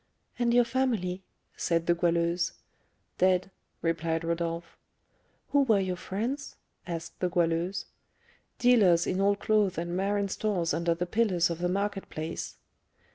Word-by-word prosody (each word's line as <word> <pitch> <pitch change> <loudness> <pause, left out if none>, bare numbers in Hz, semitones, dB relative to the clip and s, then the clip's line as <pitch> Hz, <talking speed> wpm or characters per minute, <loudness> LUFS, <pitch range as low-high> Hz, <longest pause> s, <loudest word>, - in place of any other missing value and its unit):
"And 240 -1 +2
your 245 +1 +6
family?" 230 -8 -1 0.3
said 165 -1 0
the 175 - +4
Goualeuse. 170 0 +1 0.7
"Dead," 185 +1 +3 0.3
replied 165 0 0
Rodolph. 170 0 -3 0.8
"Who 285 - +5
were 225 -7 +4
your 185 -1 -1
friends?" 230 +10 -4 0.3
asked 170 -1 -6
the 180 - +1
Goualeuse. 175 +2 0 0.7
"Dealers 200 -9 +5
in 190 - 0
old 200 0 +3
clothes 210 -3 +2
and 175 +1 -2
marine 200 +2 0
stores 185 -6 0
under 170 +1 +1
the 175 +1 -2
pillars 180 -4 +2
of 170 - -4
the 175 0 0
market 200 +1 -2
place." 160 +1 -5
180 Hz, 135 wpm, -29 LUFS, 170-205 Hz, 0.8 s, your